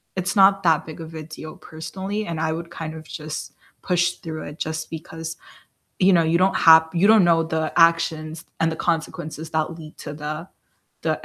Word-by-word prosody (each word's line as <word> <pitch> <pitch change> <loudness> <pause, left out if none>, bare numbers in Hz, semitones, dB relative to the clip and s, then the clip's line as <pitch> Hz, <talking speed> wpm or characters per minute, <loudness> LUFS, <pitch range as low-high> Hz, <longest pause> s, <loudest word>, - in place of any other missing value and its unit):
it's 185 +2 -2
not 195 0 +6
that 160 -2 +3
big 160 +1 -9
of 160 0 -9
a 155 - -6
deal 155 0 -9
personally, 190 +6 -5
and 165 -2 -3
I 160 0 0
would 170 +1 -5
kind 160 -2 -6
of 160 - -9
just 155 0 -7 0.3
push 175 -1 +2
through 160 -3 -7
it 145 +2 -9
just 160 0 -3
because, 160 0 -7 0.6
you 190 +1 +5
know, 170 -2 +5
you 165 +1 +2
don't 190 +2 +3
hap 160 0 +7
you 180 +4 +3
don't 220 -3 +7
know 165 -1 +4
the 160 -1 -2
actions 165 -1 +2 0.2
and 165 - +3
the - - -3
consequences 160 -1 -3
that 160 +1 -1
lead 155 -1 -11
to 145 - -6
the 155 +3 -5 0.6
the - - -1
160 Hz, 200 wpm, -23 LUFS, 155-170 Hz, 0.6 s, hap